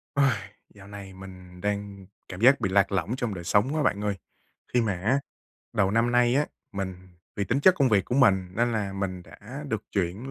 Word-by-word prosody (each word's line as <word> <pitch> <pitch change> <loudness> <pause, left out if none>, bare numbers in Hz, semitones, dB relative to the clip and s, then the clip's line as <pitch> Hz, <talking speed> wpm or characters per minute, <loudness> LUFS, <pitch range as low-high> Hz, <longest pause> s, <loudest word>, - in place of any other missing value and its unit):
Uầy, 140 -2 +4 0.4
dạo 100 -1 -14
này 100 -2 -9
mình 90 -1 -12
đang 100 -1 -3 0.2
cảm 95 +2 -7
giác 130 +4 +6
bị 95 - +1
lạc 100 +1 +3
lỏng 95 +4 -1
trong 120 -5 -2
đời 90 -2 -6
sống 105 - +2
quá 155 - +1
bạn 105 -6 +1
ơi. 105 -1 0 0.6
Khi 125 - +4
mà 110 -3 0
á 105 +10 +1 0.5
đầu 95 -2 +2
năm 115 +3 +2
nay 120 0 +4
á, 145 +2 +2 0.3
mình 95 -2 -4 0.4
vì 100 - 0
tính 125 +8 0
chất 185 +5 +6
công 140 -7 +3
việc 100 -5 +3
của 120 - -3
mình 100 -9 +4
nên 120 +1 +2
là 105 -3 -2
mình 95 -2 -3
đã 135 +10 -10
được 110 -4 -2
chuyển 100 +7 -2
100 Hz, 215 wpm, -26 LUFS, 95-120 Hz, 0.6 s, giác